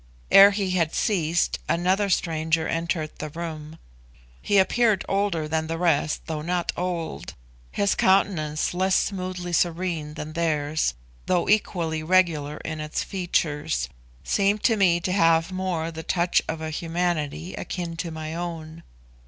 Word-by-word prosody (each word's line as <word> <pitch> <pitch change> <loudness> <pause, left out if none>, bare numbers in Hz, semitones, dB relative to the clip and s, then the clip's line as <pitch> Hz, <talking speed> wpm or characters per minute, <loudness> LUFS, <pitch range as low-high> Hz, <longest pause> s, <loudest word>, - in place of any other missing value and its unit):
Ere 195 +1 +10
he 200 -2 -1
had 170 -4 0
ceased 170 -5 +1
another 185 +4 +1
stranger 160 -2 0
entered 165 -1 -2
the 155 - -4
room. 160 -1 -7 0.6
He 205 - +2
appeared 215 +1 +3
older 195 -6 0
than 160 +1 -1
the 165 0 -3
rest, 165 -3 +1
though 160 -2 -4
not 175 +2 -1
old; 175 -2 -4 0.4
his 200 -1 +1
countenance 175 -6 +1
less 185 +1 +1
smoothly 185 -2 -2
serene 170 -3 -1
than 155 0 -6
theirs, 155 - 0 0.3
though 180 -2 +1
equally 170 -6 +1
regular 155 -4 +2
in 155 -1 -4
its 155 0 -3
features, 150 - -1 0.3
seemed 200 - +1
to 230 - +4
me 180 -4 +3
to 175 +2 -2
have 165 -2 +3
more 180 -3 -2
the 160 0 -7
touch 175 +1 +1
of 160 0 -4
a 160 0 -4
humanity 165 0 -2
akin 170 -2 -5
to 170 - -3
my 160 0 -6
own. 165 -1 -6
170 Hz, 145 wpm, -25 LUFS, 155-185 Hz, 0.6 s, Ere